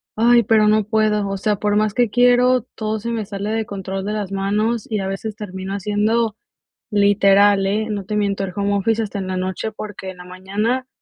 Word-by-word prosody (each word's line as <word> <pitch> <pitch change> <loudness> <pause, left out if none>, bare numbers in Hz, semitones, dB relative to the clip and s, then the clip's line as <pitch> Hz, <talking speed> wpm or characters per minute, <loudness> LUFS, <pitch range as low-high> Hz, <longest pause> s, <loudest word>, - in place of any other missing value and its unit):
Ay, 235 +1 +5
pero 215 0 +3
no 215 0 +3
puedo, 210 -1 +1
o 195 0 -3
sea, 210 +2 0
por 205 +1 0
más 215 -1 +1
que 240 -3 +2
quiero, 245 +1 +4
todo 215 0 -2
se 235 +3 -5
me 225 -2 -2
sale 200 0 -5
de 220 -1 -1
control 195 -1 -5
de 210 - -2
las 205 -3 -3
manos 210 +3 -1
y 215 - 0
a 190 - -3
veces 200 +2 -4
termino 190 -2 -6
haciendo 210 +2 0 0.6
literal, 200 -1 +4
¿eh? 215 +2 0
No 200 -2 -4
te 210 - -3
miento, 200 -1 0
el 185 -2 -5
home 200 0 0
office 225 +3 +1
hasta 205 -1 -5
en 190 - -4
la 185 0 -2
noche, 185 +4 -3
porque 205 -3 -7
en 180 - -14
la 180 - -11
mañana, 205 +8 -2
210 Hz, 220 wpm, -20 LUFS, 195-220 Hz, 0.6 s, Ay